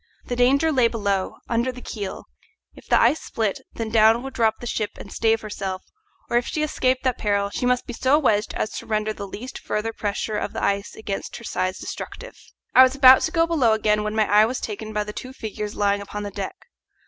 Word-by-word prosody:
The 245 - -3
danger 275 +6 +3
lay 255 -5 +4
below, 200 -4 -1
under 235 +2 0
the 250 - -10
keel; 205 -5 -6 0.5
if - - -16
the - - +4
ice 315 - +3
split, 215 -4 -2
then 225 -1 -4
down 225 +2 +5
would 270 - -7
drop 220 -2 +2
the - - -8
ship 215 -3 -3
and 195 - -10
stave 225 0 +2
herself, 195 -3 -5 0.4
or 235 - +1
if 240 - 0
she 305 - -1
escaped 255 -4 0
that 255 -2 0
peril 200 -1 0
she 245 - -1
must 250 0 +1
be 245 - -6
so 265 +5 +3
wedged 220 -8 +1
as 215 - -2
to - - -12
render 215 0 0
the 200 -1 -7
least 250 +7 -8
further 225 +2 -3
pressure 210 0 -2
of - - -4
the - - -4
ice 200 0 -1
against 200 -3 -5
her - - -9
sides 185 -4 -2
destructive. - - -7 0.4
I 255 - +9
was 260 +1 +6
about 260 -1 +8
to 320 - -1
go 330 -1 +3
below 290 -10 +3
again, 210 -1 +2
when 210 0 -3
my 215 -1 +3
eye 210 +1 +6
was 250 +2 -3
taken 215 0 -5
by 210 -1 -1
the 210 0 -7
two 255 +3 -7
figures 215 -3 -5
lying 200 0 +1
upon 205 +1 -6
the 205 - -5
deck. 200 - -5
220 Hz, 230 wpm, -23 LUFS, 210-250 Hz, 0.5 s, I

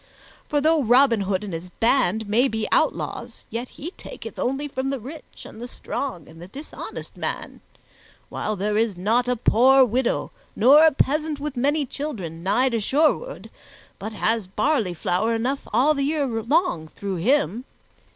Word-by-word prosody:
For, 295 - +2
though 315 +1 +3
Robin 245 -2 +4
Hood 195 0 -1
and 200 -4 -6
his 165 +2 -6
band 220 0 +1
may 235 +6 +3
be 220 -3 -2
outlaws, - - -1
yet 240 +2 -4
he 325 +5 -8
taketh - - -10
only 270 +4 -1
from 270 -1 -3
the 275 -1 -2
rich 285 +7 -11
and 220 - -11
the 245 - -5
strong 240 - -5
and 165 - -14
the 175 - -9
dishonest 280 +10 -8
man, - - -4 0.7
while 215 - -3
there 210 +2 0
is 220 -5 0
not 225 +7 +1
a 250 - +1
poor 260 +4 +5
widow 245 +2 -1 0.2
nor 275 +8 +7
a - - +5
peasant 300 +2 0
with 295 -1 -4
many 285 +4 +1
children, 210 - -6
nigh 210 +9 +2
to 235 -2 -1
Sherwood, 310 - 0 0.5
but 215 +2 -6
has 220 -1 0
barley 220 - 0
flour 200 +8 0
enough 255 +5 -2
all 290 +5 +4
the 280 - -2
year 290 +1 0
long 235 - 0
through 195 +3 -5
him. 240 - +1
245 Hz, 170 wpm, -23 LUFS, 210-280 Hz, 0.7 s, nor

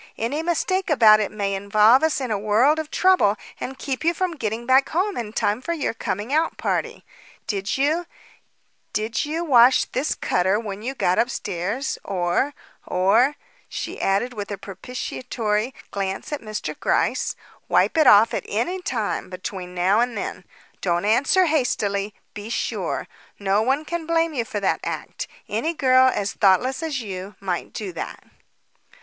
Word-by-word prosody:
Any 265 +8 -1
mistake 350 +3 0
about 220 -7 +7
it 210 - -1
may 200 -2 -2
involve 210 +6 +4
us 315 -2 +1
in 255 -4 -3
a 210 - 0
world 230 +9 +3
of 315 -1 -4
trouble 365 - +3 0.2
and 265 +1 -5
keep 270 -1 -4
you 335 +1 +2
from 370 0 -1
getting 230 -3 -3
back 260 +2 +4
home 380 +5 0
in 225 -3 -4
time 215 +1 0
for 340 - -2
your 310 -7 -2
coming 220 +2 -3
out 320 +2 +1
party. - - -2 0.4
Did 200 +2 -2
you 310 +6 +1 0.9
did 220 +4 -1
you 320 +3 -2
wash 255 -5 +6
this 275 +4 -2
cutter 185 +3 +1
when 205 -3 -6
you 260 +4 -4
got 180 -7 +1
upstairs, 215 +1 -2
or 185 +9 0 0.3
or 225 +10 +3 0.2
" - - -33
she - - -5
added, 200 +6 +1
with 205 -3 -6
a 200 - -4
propitiatory 215 +2 -3 0.2
glance 195 +8 -3
at 295 - -3
Mr. 215 -1 -5
Gryce - - 0 0.3
"wipe - - +3
it 310 -4 +4
off 215 +1 +7
at - - -2
any 350 - -1
time 225 - -2
between 185 0 -6
then 185 +4 +3
and 240 0 0
now? 200 - -4 0.4
Don't 175 +1 0
answer 275 - +4
hastily. 210 - 0 0.2
Be 210 +1 -7
sure. - - -2 0.3
No 200 +1 +1
one 270 +6 +1
can 340 0 -4
blame 330 -1 +1
you 240 -5 -1
for 210 - -4
that 195 - +1
act. - - -5 0.2
Any 330 +1 -1
girl, 260 -2 +5
as 200 -4 -2
thoughtless 225 - +3
as 305 -5 -2
you, 195 -2 -7
might 185 -3 -3
do 200 -4 -5
that." - - -6
230 Hz, 165 wpm, -23 LUFS, 200-290 Hz, 0.9 s, about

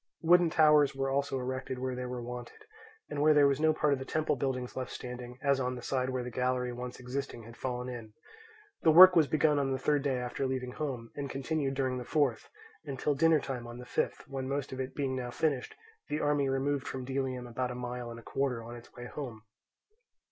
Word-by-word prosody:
Wooden 175 +1 +6
towers 150 -3 +5
were 135 0 -1
also 140 0 0
erected 130 0 -3
where 130 0 -2
they 125 0 -4
were 125 -1 -5
wanted, 125 - -8 0.4
and 145 - -3
where 155 0 +5
there 145 -1 +7
was 140 0 +3
no 160 0 +4
part 150 -2 +2
of 135 - -1
the - - -4
temple 155 +2 0
buildings 130 -2 -2
left 130 -1 -3
standing, 125 0 -7
as 140 -1 +3
on 125 -1 -1
the 125 - -8
side 130 -1 0
where 130 -1 -2
the 125 - -6
gallery 125 0 0
once 125 +1 -6
existing 130 -1 -5
had 115 +1 -12
fallen 125 0 -3
in. 115 -4 -7 0.7
The 165 - +4
work 180 +3 +10
was 160 -4 +5
begun 150 -1 +3
on 135 -1 0
the 130 - 0
third 145 +1 +1
day 135 -2 0
after 125 +2 -2
leaving 130 -1 -3
home, 125 -6 -4
and 140 -1 -4
continued 135 0 -1
during 130 -2 0
the - - -5
fourth, 135 -4 0 0.3
and 135 - -5
till 150 - +1
dinnertime 140 -5 +2
on 120 0 -8
the 125 - -9
fifth, - - -2
when 135 -1 -4
most 140 0 -2
of 130 - -6
it 130 0 -4
being 135 -2 -1
now 125 -1 -3
finished 135 0 -1 0.3
the 150 - -1
army 145 -2 +2
removed 135 +1 0
from 130 -1 -4
Delium 130 -1 -2
about 125 +1 -2
a 125 - -5
mile 125 -1 -5
and 115 0 -8
a - - -14
quarter 130 -3 -1
on 120 +1 -8
its 120 - -13
way 120 - -8
home. 125 -5 -7
130 Hz, 225 wpm, -31 LUFS, 125-140 Hz, 0.7 s, work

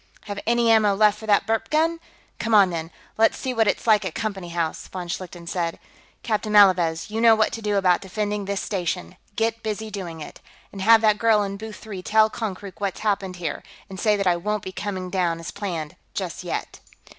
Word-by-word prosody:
"Have 205 -1 -5
any 235 0 +3
ammo 215 -3 +4
left 210 0 +3
for 220 - -9
that 205 -1 +4
burp 225 +1 -1
gun? 325 +2 +1 0.4
Come 225 0 +1
on, 195 -3 +6
then; 165 -1 -4 0.3
let's 225 - +4
see 260 -2 -3
what 225 -2 +2
it's - - 0
like 215 -3 +4
at 185 -4 -5
Company 195 -5 -4
House," 165 -2 -3
von 180 -2 -6
Schlichten 175 0 -6
said. 170 -1 -2 0.5
"Captain 215 -2 -1
Malavez, 180 -4 +4
you 220 +1 -1
know 230 -1 +7
what 215 -1 +2
to 225 - -5
do 210 -1 0
about 185 -3 +3
defending 205 +1 -3
this 200 0 -2
station. 175 - -3 0.2
Get 225 0 0
busy 220 0 -4
doing 175 -5 -6
it. 150 - -9 0.3
And 195 - -8
have 225 +3 +6
that 215 -1 +3
girl 220 -2 +4
in 200 0 -4
booth 215 +1 -8
three 200 -4 -8
tell 215 +3 +3
Konkrook 200 -4 -6
what's 200 -2 -2
happened 195 -3 -1
here, 175 -2 -4 0.3
and 190 - -7
say 215 -2 +3
that 200 - -1
I 175 -1 +3
won't 210 +3 -2
be 190 - -6
coming 185 -1 -5
down, 175 -3 0
as 165 - -6
planned, 170 -7 -5 0.2
just - - -4
yet." - - -4
205 Hz, 215 wpm, -24 LUFS, 180-220 Hz, 0.5 s, know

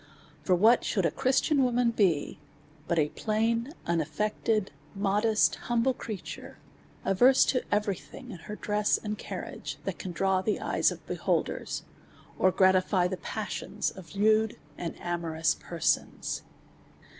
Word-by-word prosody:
For 185 - +3
what 220 +7 +5
should 195 -5 0
a - - +2
Christian 270 +2 +2
woman 245 -1 +2
be 180 -12 +1 0.5
but 170 - 0
a 150 -2 +3
plain, 230 - 0
unaffected, 190 +6 0 0.2
modesty 210 +2 +2
humble 240 +2 +1
creature, 215 -6 -7 0.5
averse 250 +8 +5
to 255 - +1
every 205 -2 +1
thing, 255 -2 -11
in 185 - -8
her 210 +5 -7
dress 210 0 +1
and 210 -1 -4
carriage, - - -6
that - - -3
can 185 - -5
draw 190 +1 +1
the 210 +2 0
eyes - - +2
of - - -8
beholders, - - -2 0.6
or 185 - +5
gratify 185 0 +3
the 185 - -3
passions 210 +2 -3
of 190 0 -12
lewd 215 +2 +3 0.2
and 170 +1 -5
amorous 165 -2 0
persons? 170 -3 -1
205 Hz, 135 wpm, -29 LUFS, 180-225 Hz, 0.6 s, what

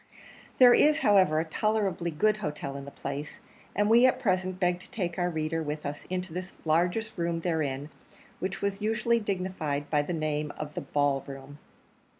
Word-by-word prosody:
There 250 -2 +8
is, 305 +1 +4
however, 185 -7 +4
a 160 - 0
tolerably 195 -1 0
good 210 +7 +2
hotel 150 -7 -4
in 140 0 -6
the - - -7
place, 140 +1 -6 0.4
and 205 0 +2
we 235 +3 +7
at 255 - +2
present 185 -5 0
beg 180 -1 +1
to - - -12
take 180 -4 -3
our 175 0 +1
reader 160 0 -2
with 150 0 -4
us 145 +1 -5
into 180 -2 -3
the 180 +1 -5
largest 175 +8 +1
room 170 0 -1
therein, 150 -4 -2 0.5
which 190 +1 -4
was 200 0 -1
usually 225 +2 +2
dignified 180 -8 -3
by 150 -2 +3
the 145 - -4
name 155 -2 -1
of 150 -1 -6
the - - -4
Ball 145 -2 0
Room. 140 +1 -9
175 Hz, 180 wpm, -28 LUFS, 150-200 Hz, 0.5 s, There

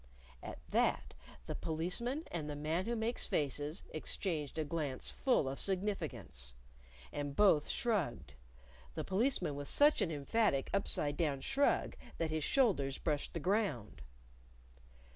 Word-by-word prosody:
At - - -7
that, - - +2 0.3
the - - -3
Policeman 180 - -2
and 155 -3 -3
the 145 - -3
Man 155 +5 -1
Who 235 - -1
Makes 230 +2 -1
Faces 145 +3 -1
exchanged 155 -2 -2
a 160 - +1
glance 145 -4 -2
full 250 - +2
of 135 +1 -3
significance. 155 - -3 0.6
And 145 -1 -3
both 190 -8 +5
shrugged 190 - -1 0.6
the - - -2
Policeman 190 - +1
with 145 0 -5
such 295 +1 +5
an - - +2
emphatic 145 0 +1
upside 145 -7 +1
down 145 -5 0
shrug 280 - +2 0.2
that 160 -1 -1
his 155 -1 -1
shoulders 175 - +2
brushed 150 0 -1
the - - 0
ground. 165 - 0
160 Hz, 135 wpm, -35 LUFS, 145-205 Hz, 0.6 s, both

